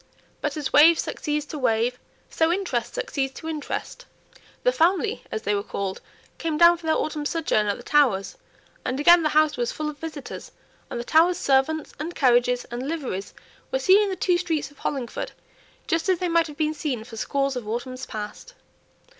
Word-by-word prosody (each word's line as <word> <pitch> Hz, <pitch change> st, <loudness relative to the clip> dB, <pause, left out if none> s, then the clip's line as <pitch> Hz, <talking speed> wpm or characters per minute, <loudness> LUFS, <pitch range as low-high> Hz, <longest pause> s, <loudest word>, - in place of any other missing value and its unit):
But -, -, -2 dB
as 295 Hz, -3 st, -3 dB
wave 320 Hz, +3 st, +8 dB
succeeds 300 Hz, -2 st, -2 dB
to 300 Hz, 0 st, -7 dB
wave, 240 Hz, 0 st, +1 dB, 0.3 s
so 325 Hz, 0 st, +1 dB
interest 385 Hz, +2 st, -2 dB
succeeds 280 Hz, -, -2 dB
to 320 Hz, -, -8 dB
interest. 305 Hz, -2 st, -5 dB, 0.6 s
"The -, -, +4 dB
family," 390 Hz, +1 st, +1 dB
as 220 Hz, -, -3 dB
they 210 Hz, -, +1 dB
were 200 Hz, -, 0 dB
called, 195 Hz, -1 st, -4 dB, 0.4 s
came 320 Hz, -2 st, -1 dB
down 340 Hz, +1 st, +7 dB
for 330 Hz, -1 st, -9 dB
their 315 Hz, -, +3 dB
autumn 305 Hz, -1 st, -2 dB
sojourn 290 Hz, -9 st, 0 dB
at 205 Hz, -, 0 dB
the -, -, -11 dB
Towers, 250 Hz, -10 st, +2 dB, 0.5 s
and 260 Hz, +2 st, -2 dB
again 345 Hz, +4 st, +7 dB
the 310 Hz, -, +1 dB
house 310 Hz, -1 st, +3 dB
was 240 Hz, 0 st, -1 dB
full 305 Hz, 0 st, -3 dB
of 290 Hz, -, -17 dB
visitors, 315 Hz, -4 st, -7 dB, 0.4 s
and 240 Hz, -, -4 dB
the -, -, -3 dB
Towers' 335 Hz, +7 st, +4 dB
servants, 280 Hz, +3 st, +1 dB
and 330 Hz, +4 st, -5 dB
carriages, 245 Hz, -1 st, +3 dB
and 245 Hz, +3 st, -4 dB
liveries 260 Hz, -, -4 dB, 0.3 s
were -, -, 0 dB
seen 400 Hz, -3 st, +5 dB
in 415 Hz, -, +1 dB
the 380 Hz, -, -2 dB
two 360 Hz, -1 st, +1 dB
streets 320 Hz, -5 st, -2 dB
of 290 Hz, -, -21 dB
Hollingford, 260 Hz, -5 st, -4 dB, 0.5 s
just 330 Hz, +3 st, 0 dB
as 370 Hz, -, +3 dB
they 360 Hz, 0 st, -1 dB
might 335 Hz, 0 st, +3 dB
have 295 Hz, -1 st, -11 dB
been 310 Hz, -1 st, +1 dB
seen 280 Hz, -7 st, -3 dB
for 225 Hz, 0 st, -11 dB
scores 275 Hz, +4 st, -1 dB
of 240 Hz, -4 st, -5 dB
autumns 255 Hz, +3 st, -4 dB
past. 215 Hz, -, -7 dB
300 Hz, 195 wpm, -24 LUFS, 250-330 Hz, 0.6 s, wave